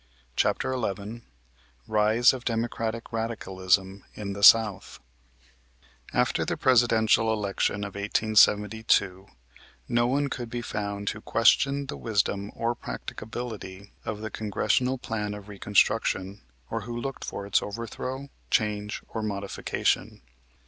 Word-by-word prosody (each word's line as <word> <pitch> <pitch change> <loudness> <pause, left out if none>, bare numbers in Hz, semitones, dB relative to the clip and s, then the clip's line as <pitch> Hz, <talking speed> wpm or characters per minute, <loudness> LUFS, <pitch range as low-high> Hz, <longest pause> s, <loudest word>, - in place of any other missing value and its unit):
CHAPTER 130 - +1
XI 110 -1 -3 0.7
RISE 110 +4 +4
OF 130 -2 -6
DEMOCRATIC 115 -1 -2
RADICALISM 95 -4 0
IN 100 -2 -4
THE 100 - -7
SOUTH 110 -2 +5 1.1
After - - +1
the - - -2
Presidential 115 -3 +4
election 100 -1 -1
of 100 -1 -6
1872 105 -1 +2 0.6
no 120 0 +2
one 140 +3 +1
could 120 -3 -5
be 120 0 -4
found 100 -2 -4
who 105 - -9
questioned 140 +5 +3
the - - -4
wisdom 100 -2 -1
or 115 +1 0
practicability 110 -5 -7
of 105 -1 -4
the 110 -1 -5
Congressional 125 +5 0
Plan 105 -4 -3
of 105 -1 -10
Reconstruction, 100 -1 +1 0.3
or 115 - -2
who 120 +3 -6
looked 135 +3 -5
for 100 - -5
its 100 0 +2
overthrow, 120 +5 -5 0.2
change 105 -1 0
or 110 - -4
modification. 100 - -2
110 Hz, 120 wpm, -27 LUFS, 100-115 Hz, 1.1 s, SOUTH